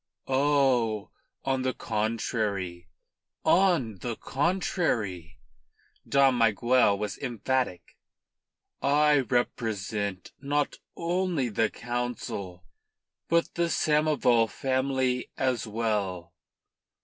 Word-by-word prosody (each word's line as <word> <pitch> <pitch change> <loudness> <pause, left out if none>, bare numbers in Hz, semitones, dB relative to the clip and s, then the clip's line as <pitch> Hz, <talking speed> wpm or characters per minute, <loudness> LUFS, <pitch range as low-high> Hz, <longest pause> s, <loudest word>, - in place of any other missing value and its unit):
"Oh, 130 -6 +2 0.3
on 135 -1 +1
the 130 0 -1
contrary 105 -5 -2 0.6
on 170 - +3
the 120 +2 -3
contrary!" 125 - -1 0.7
Dom 135 -3 +4
Miguel 115 -1 +3
was 105 -1 -4
emphatic. 125 -5 -2 0.8
"I 150 +1 +4
represent 105 -6 -2
not 145 +1 -1 0.2
only 170 -6 0
the 110 +1 +1
Council, 120 -7 -4 0.6
but 170 0 +1
the 170 0 0
Samoval 150 -8 +3
family 130 +1 0
as 130 -3 0
well. 100 -6 -2
120 Hz, 80 wpm, -28 LUFS, 105-140 Hz, 0.8 s, Dom